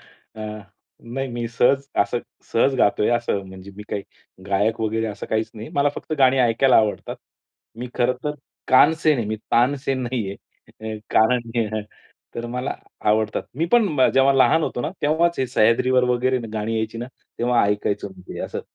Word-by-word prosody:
अ, 110 - -18 0.6
नाही, 130 +3 -4
मी 120 -1 -4
सहज 130 +3 +2
असं 120 - +1 0.3
सहज 135 +4 +3
गातोय 105 +1 +3
असं. 120 -4 0
म्हणजे 95 +1 -11
मी 105 - -8
काही 100 - -3 0.4
गायक 100 +3 +1
वगैरे 110 0 -1
असं 105 -2 -6
काहीच 110 0 -1
नाही. 110 +1 -8
मला 145 0 +3
फक्त - - -7
गाणी 135 -1 +5
ऐकायला 125 +2 +4
आवडतात. 110 -2 0 0.6
मी 125 - -5
खरंतर 125 +4 0 0.3
कानसेन 155 +2 +5
आहे. 115 - -1
मी 110 +1 -2
तानसेन 130 +2 +1
नाहीये. 115 -6 -3 0.8
कारण 115 +1 +3 0.8
तर 120 - -4
मला 125 +2 -3 0.3
आवडतात. 110 0 +1
मी 165 +3 0
पण 190 - +4
जेव्हा 135 +1 +5
लहान 135 +4 +4
होतो 120 - -2
ना, - - -2
तेव्हाच 165 +3 +2
हे 130 - +1
सह्याद्रीवर 125 +2 +3
वगैरे 130 +1 +1
गाणी 110 +1 -2
यायची 110 +1 -3
ना, 120 - -4 0.3
तेव्हा 120 -1 +3
ऐकायचो 105 0 -1
मी. 95 -1 -15
ते - - -7
असं, - - -4
120 Hz, 160 wpm, -22 LUFS, 110-135 Hz, 0.8 s, गाणी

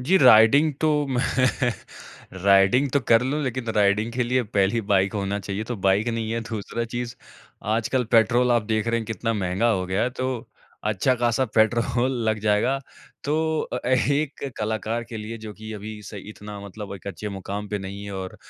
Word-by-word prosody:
जी, 175 +10 +3
riding 130 +5 +7
तो 155 - +3 0.2
मैं 130 -2 0 1.2
riding 100 +8 +5
तो 140 - +3
कर 115 +1 +6
लूँ 145 +4 -1
लेकिन 130 -2 -3
राइडिंग 105 +2 +2
के 125 +1 0
लिए 125 +1 +1
पहली 105 0 +1
बाइक 95 0 +3
होना 100 0 -1
चाहिए, 100 +2 -4
तो 120 +1 -4
बाइक 100 +3 +2
नहीं 115 -1 -2
है, 115 - -1
दूसरा 115 +1 -4
चीज़ 120 +1 -5 0.6
आजकल 125 +2 0
पेट्रोल 120 +2 +4
आप 120 - +3
देख 110 +1 -1
रहे 115 - +1
हैं 110 - -7
कितना 115 +1 -2
महँगा 95 +3 0
हो 95 -4 0
गया 95 +2 0
है, 125 - +1
तो 130 -1 -4 0.4
अच्छा-खासा 120 +4 +1
पेट्रोल 120 +3 +2 0.2
लग 110 0 +1
जाएगा, 105 +6 +2 0.5
तो 160 +2 +1
अ - - -4
अ, - - -4
एक 140 +2 0
कलाकार 110 +2 -2
के 115 0 -8
लिए 110 +2 -6
जो 110 -1 -8
कि 110 +1 -8
अभी 105 0 -7
सही 100 0 -9
इतना 105 -1 -9
मतलब 100 0 -8
एक 100 - -13
अच्छे 100 +2 -5
मुकाम 100 +1 -5
पे 105 - -2
नहीं 100 +1 -7
है 100 - -6
और 95 -1 -6
110 Hz, 190 wpm, -24 LUFS, 100-125 Hz, 1.2 s, राइडिंग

